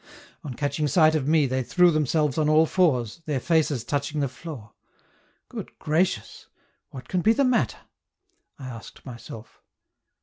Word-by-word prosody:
On 135 -6 -6
catching 150 +2 -1
sight 155 +2 +4
of 145 -4 -1
me 155 -1 +4
they 130 0 -1
threw 180 +7 +4
themselves 150 -1 +1
on 150 -1 +2
all 155 +1 +5
fours, 150 - +1
their 145 -3 0
faces 150 -5 +1
touching 145 +2 -2
the 140 - +1
floor. 130 -5 -10 0.7
Good - - -9
gracious! 165 +5 -1 0.4
What 130 -1 -10
can 180 - -1
be 220 +5 +4
the 280 - +2
matter? 255 -1 +1 0.8
I 135 - -9
asked 115 -3 -11
myself. 115 -3 -11
150 Hz, 155 wpm, -25 LUFS, 130-160 Hz, 0.8 s, all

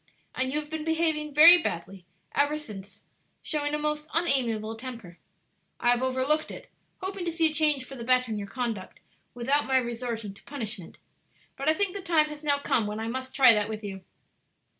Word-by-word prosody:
And 260 0 -1
you 295 - 0
have 300 0 -9
been 315 -1 -4
behaving 320 -2 0
very 330 +4 +9
badly 175 - -5 0.3
ever 290 +1 +2
since, 200 -8 -10 0.4
showing 295 -1 -1
a - - -1
most 300 0 -3
unamiable 235 -9 0
temper. 225 -7 -9 0.6
I 240 - +3
have 245 0 +1
overlooked 260 +4 0
it, - - -10 0.3
hoping 380 0 -4
to 340 - -2
see 325 -1 +2
a - - -9
change 300 -4 +2
for 270 - -11
the 240 -3 -7
better 255 -1 +2
in 215 - -2
your 200 - -6
conduct 225 -3 -5 0.4
without 270 +5 0
my 265 0 +3
resorting 235 -4 -3
to 195 - -18
punishment; 220 - -7 0.6
but 275 +2 0
I 315 - +4
think 400 -1 0
the 400 - -4
time 320 -4 +2
has 300 0 -9
now 285 -1 +3
come 235 -6 0
when 210 +1 -4
I 225 - -4
must 260 +1 -5
try 260 -4 +8
that 210 0 0
with 215 0 -6
you." 195 -2 -7
260 Hz, 200 wpm, -27 LUFS, 225-300 Hz, 0.6 s, very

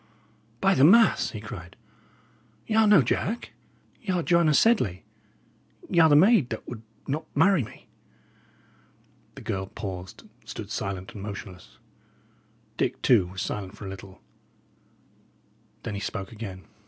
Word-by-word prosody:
"By 195 - +4
the 135 - +3
mass!" 220 +9 +6
he - - -7
cried, - - -9 0.9
"y' 220 - -3
are 220 0 +5
no 200 -9 +7
Jack; 210 - -2 0.5
y' 215 - -10
are 180 -2 0
Joanna 170 -3 +3
Sedley; 165 - +3 0.9
y' 170 - +3
are 160 -1 +7
the 145 - +6
maid 180 - +5
that 110 - -6
would 120 -3 -7 0.2
not 155 +3 -3
marry 190 -7 +4
me!" - - -13 1.5
The - - -10
girl 95 0 -3
paused, 95 -2 -7
and - - -21
stood - - -8
silent 95 -1 -4
and 105 - -8
motionless. 100 -3 -9 1.0
Dick, - - -1
too, 105 -8 +4
was 95 +1 -5
silent 100 0 -5
for 105 - -9
a - - -5
little; 95 0 -10 1.6
then 115 - -4
he 100 - -4
spoke 95 -2 -5
again. 100 -4 -8
115 Hz, 145 wpm, -26 LUFS, -, 1.6 s, no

